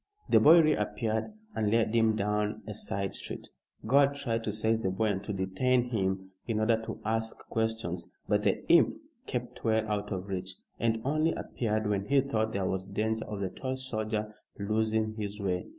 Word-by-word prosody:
The - - +7
boy 165 +3 +8
reappeared 115 -7 0 0.3
and 110 -2 0
led 110 0 +2
him 115 -1 +4
down 105 +1 -1
a 105 - -5
side 100 -1 -3
street. - - -5 0.4
Gore 140 +5 +6
tried 135 -5 -2
to 105 - 0
seize 110 +1 +1
the 95 - 0
boy 105 +4 +1
and 100 -1 -1
to 105 - -3
detain 120 +6 +1
him 95 -3 -1 0.2
in 110 -2 0
order 110 +1 +2
to 110 - -6
ask 110 +1 0
questions, 110 0 -1 0.2
but - - +2
the - - 0
imp - - +5 0.3
kept - - -4
well 110 -1 +2
out 105 -1 -2
of 95 0 -3
reach, 95 -1 -4 0.2
and 115 -1 +1
only 155 +3 +2
appeared 110 -2 -2
when 100 -1 0
he 140 +3 +4
thought 110 -5 0
there 100 -2 -1
was 95 0 -1
danger 110 +3 -1
of 105 -2 -5
the 95 - -1
tall 130 +7 -4
soldier 110 -4 -2 0.2
losing 110 +1 0
his 105 -1 -4
way. 90 -3 -1
110 Hz, 185 wpm, -30 LUFS, 100-115 Hz, 0.4 s, boy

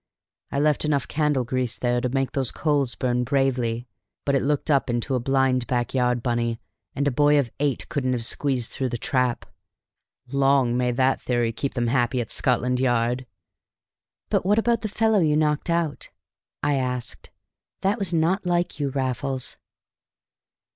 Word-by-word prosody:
I 140 - 0
left 150 0 +2
enough 145 -3 0
candle 150 -4 +1
grease 125 0 -2
there 120 0 0
to 125 - 0
make 135 +1 -1
those 135 -4 -1
coals 145 -6 0
burn 125 -1 0
bravely. 125 -3 0 0.4
But 140 - +1
it 135 - +3
looked 145 +2 0
up 140 -2 +2
into 120 +3 -1
a 130 - +2
blind 130 -1 +1
backyard, 125 0 0
Bunny, 120 -2 -1 0.4
and 140 +1 0
a - - +2
boy 145 +3 +4
of 130 -5 +1
eight 145 -3 -1
couldn't 130 -3 -1
have 120 -2 -1
squeezed 130 -2 0
through 130 -1 -2
the 120 - -3
trap. 125 0 0 0.9
Long 135 -3 +3
may 125 0 +1
that 130 +2 +1
theory 120 -2 0
keep 135 +4 -3
them 120 -2 0
happy 120 +1 +1
at 115 - -4
Scotland 125 0 +1
Yard!" 125 0 +1 1.0
"But - - +2
what 205 +3 +2
about 230 0 +2
the 220 - -2
fellow 220 0 +2
you 150 -3 +3
knocked 150 +2 +1
out?" 170 -3 -1 0.5
I 145 -1 +2
asked. 125 -2 -3 0.5
"That 200 +4 +1
was 195 -4 -1
not 170 +4 +1
like 175 -2 0
you, 140 -1 0
Raffles." 130 0 -2
130 Hz, 170 wpm, -24 LUFS, 125-145 Hz, 1.0 s, boy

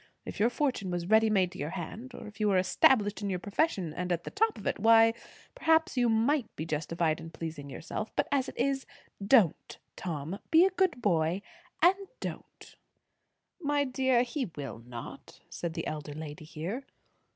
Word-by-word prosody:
If - - -7
your 225 +3 +4
fortune 245 -7 -1
was 175 -1 -2
ready 220 +3 +4
made 190 -4 +2
to 185 - -11
your 145 - -2
hand, 225 +9 -7
or - - -9
if 210 0 -12
you 215 - +2
were 195 -2 +3
established 205 +3 +3
in 200 - -2
your 185 - -1
profession 195 - -1
and 180 +2 -3
at 170 -1 0
the - - -7
top 445 - +1
of 210 - -10
it, - - -1
why, 225 +1 +6 0.4
perhaps 320 -1 +2
you 245 -2 +3
might 230 +3 +2
be 155 - -4
justified 160 +1 -1
in 165 - -8
pleasing 160 -4 -7
yourself; 175 +9 -5
but - - +1
as 275 -2 +1
it - - -12
is, 270 -1 0 0.4
don't, 200 - +3 0.2
Tom! 165 +2 -4
Be 330 +3 +7
a 385 - +2
good 360 -9 0
boy, 175 0 +1 0.4
and 365 +3 +6 0.2
don't!" - - -8 0.8
"My 290 -3 +1
dear, 260 -2 +2
he 250 - -3
will 140 -5 -6
not," 120 -1 -9
said 170 -1 -4
the - - -3
elder 150 -1 -5
lady 155 0 -8
here. 170 - -5
205 Hz, 185 wpm, -30 LUFS, 165-260 Hz, 0.8 s, Be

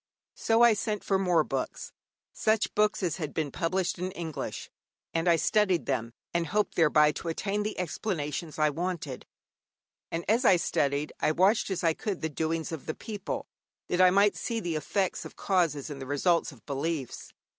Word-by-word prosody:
So 225 +1 +3
I 235 -1 +7
sent 210 0 -2
for 195 -1 +1
more 175 -4 +3
books, - - -4 0.4
such 220 -1 +1
books 210 -1 +2
as 170 -2 0
had 155 -5 -5
been 155 -3 -1
published 175 +3 -1
in 180 +1 -2
English, 160 -7 -5 0.4
and 165 +1 0
I 170 - +6
studied 190 0 +2
them, 120 -4 -1 0.2
and 170 -1 0
hoped 210 +1 0
thereby 150 -2 +5
to 170 - -7
attain 195 +5 -1
the 215 +1 -3
explanations 170 -4 -3
I 155 -1 +3
wanted; 165 -4 -4 0.8
and 165 +1 -3
as 225 +5 +3
I 195 - +7
studied, 145 -3 0
I - - +2
watched 190 +8 +3
as 190 -2 -2
I 165 -1 +4
could 195 +2 -4
the 160 - -1
doings 160 +2 -2
of 160 -4 -6
the 155 - -2
people, 210 -4 -5 0.4
that 180 - +2
I 185 - +8
might 200 +2 +4
see 230 -2 -2
the 175 -5 -3
effects 190 +5 -1
of - - -10
causes 165 -7 0
and 140 -2 -7
the 130 - -6
results 165 +5 +1
of 130 -6 -17
beliefs. 140 -1 -3
170 Hz, 185 wpm, -29 LUFS, 155-195 Hz, 0.8 s, I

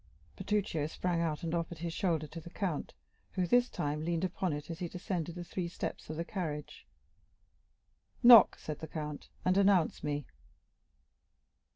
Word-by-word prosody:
Bertuccio 195 -8 -1
sprang 170 +1 -1
out, 160 -2 -1
and 165 0 -2
offered 170 0 -2
his 165 0 -4
shoulder 165 -4 0
to 165 +3 -8
the 170 - -10
count, 175 -4 -3 0.4
who, 185 -2 +1
this 245 +7 +4
time, 150 +1 -2
leaned 170 +1 -1
upon 185 -1 -1
it 150 +2 -5
as 165 - -6
he 175 - -2
descended 175 -2 -3
the 175 - -5
three 175 0 -3
steps 170 - -5
of 155 - -4
the 165 +2 -3
carriage. 160 -8 -5 1.4
"Knock," 235 -3 +9
said 155 -2 -6
the 160 - -6
count, 150 -2 -6 0.2
"and 185 +1 +3
announce 195 -4 +3
me." 145 -2 -2
170 Hz, 165 wpm, -32 LUFS, 155-185 Hz, 1.4 s, Knock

